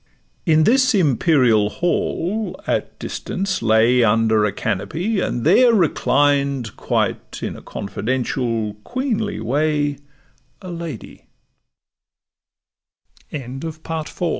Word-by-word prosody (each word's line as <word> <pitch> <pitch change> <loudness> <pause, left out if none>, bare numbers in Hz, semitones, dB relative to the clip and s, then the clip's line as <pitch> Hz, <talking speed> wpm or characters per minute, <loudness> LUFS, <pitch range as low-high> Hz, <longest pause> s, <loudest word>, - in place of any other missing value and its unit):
In 155 -1 +5
this 255 +4 +4
imperial 130 - +3
hall, 180 - -2
at - - -2
distance 190 -1 -3
lay 115 +2 +4
Under 110 -1 +3
a 105 - 0
canopy, 110 - -2
and 120 -9 -2
there 235 +8 +5
reclined 140 - +1
Quite - - -2
in - - -3
a - - -11
confidential 115 +1 -2
queenly 235 -5 -2
way, 145 +4 0 0.6
A 185 -3 -8
lady; 165 -8 -8 2.0
Baba 135 +3 -5
stopp'd, 160 +1 -6
an 175 - +2
145 Hz, 100 wpm, -20 LUFS, 115-175 Hz, 2.0 s, In